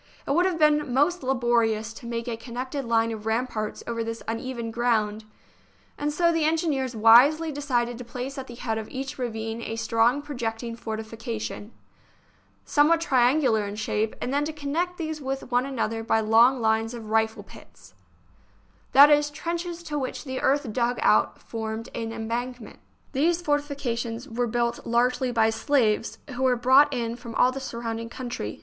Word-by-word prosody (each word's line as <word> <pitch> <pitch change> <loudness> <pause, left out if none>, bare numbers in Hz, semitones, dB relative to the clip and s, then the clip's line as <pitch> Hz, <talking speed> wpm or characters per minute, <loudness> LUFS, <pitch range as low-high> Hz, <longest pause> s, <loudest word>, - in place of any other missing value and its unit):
It - - -2
would 350 +6 +3
have 360 -3 -1
been 300 -3 +3
most 295 +8 +2
laborious 235 -4 +1
to 235 - -10
make 235 0 -4
a 235 - -2
connected 255 +4 -5
line 230 -1 +2
of 220 -1 -6
ramparts 220 -2 -2
over 230 -1 -2
this 230 0 -5
uneven 230 0 -4
ground, 220 -2 0 0.7
and 295 0 -2
so 340 +3 +2
the 330 -1 +1
engineers 305 -6 0
wisely 260 +9 +6
decided 245 -5 -1
to - - -6
place 250 +3 -6
at 265 - -7
the 240 - -9
head 225 -2 -2
of 220 - -7
each 270 0 -6
ravine 225 -2 -4
a 225 - -4
strong 230 +4 +2
projecting 235 -4 -4
for 220 -2 -5
tification, 220 -1 -6 1.0
somewhat 310 +3 +4
triangular 255 -7 +2
in 200 - -6
shape, 215 0 -1
and 255 - -3
then 285 +1 +2
to 315 - -3
connect 315 +4 -2
these 315 -2 -4
with 270 -1 -4
one 245 +2 +2
another 225 -4 -2
by 225 0 +2
long 230 +4 +5
lines 225 +1 +1
of 220 -2 -8
rifle 220 0 +1
pits - - -16 0.5
— - - -35
that 285 +3 +9
is, 295 0 +4
trenches 340 +3 -4
to 300 -3 -3
which 260 - -4
the 260 -3 -4
earth 275 -5 +1
dug 245 +1 0
out - - +3
formed 220 0 -5
an 225 -1 -4
embankment. 235 +1 -5 0.3
These 330 +5 +1
fortifications 275 -5 -2
were 245 0 -1
built 235 +1 -1
largely 250 +2 +1
by 225 -2 +3
slaves, 225 -2 +1
who 250 0 -5
were 260 -1 +3
brought 260 +4 +5
in 235 -2 -2
from 235 -2 -9
all 255 - +4
the 270 - -5
surrounding 230 -3 -5
country. 240 - -5
245 Hz, 175 wpm, -25 LUFS, 225-280 Hz, 1.0 s, that